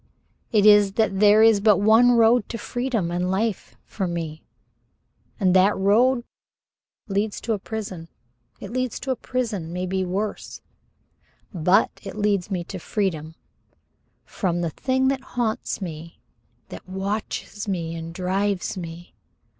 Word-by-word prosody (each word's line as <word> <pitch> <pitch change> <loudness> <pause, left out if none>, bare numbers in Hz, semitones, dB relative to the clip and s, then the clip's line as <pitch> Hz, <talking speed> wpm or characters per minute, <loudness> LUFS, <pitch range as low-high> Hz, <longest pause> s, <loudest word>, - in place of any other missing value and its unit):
It 210 -2 +3
is, 205 -2 +6
that 200 -3 +1
there 210 +1 +6
is 225 -2 +6
but 210 0 +4
one 225 +4 +5
road 230 -1 +4
to 230 - -4
freedom 235 -6 -2
and 180 +1 -1
life 200 +2 -2
for 190 -3 -3
me 165 -2 -4 1.0
and 185 -3 +3
that 190 +2 +4
road 240 +6 +3 0.8
leads 205 +1 -1
to 230 - -1
a 210 - -2
prison. 195 -6 -6 0.5
It - - -8
leads 255 -1 -2
to 270 - -2
a - - +1
prison, 220 -10 -3
maybe 185 +1 -2
worse, 195 +4 -4 0.9
but 180 +2 +3
it - - -8
leads 205 -3 0
me 180 -3 -2
to 185 +2 -7
freedom 160 -5 -3 0.9
from 175 -4 -2
the 170 -2 -2
thing 260 - 0
that 270 -1 -1 0.2
haunts 220 -3 -1
me, 165 -1 -8 0.5
that - - -10
watches 205 +2 -4
me 170 -4 -2
and 165 0 -6
drives 190 +2 -1
me. 175 -1 -8
200 Hz, 140 wpm, -23 LUFS, 180-220 Hz, 1.0 s, is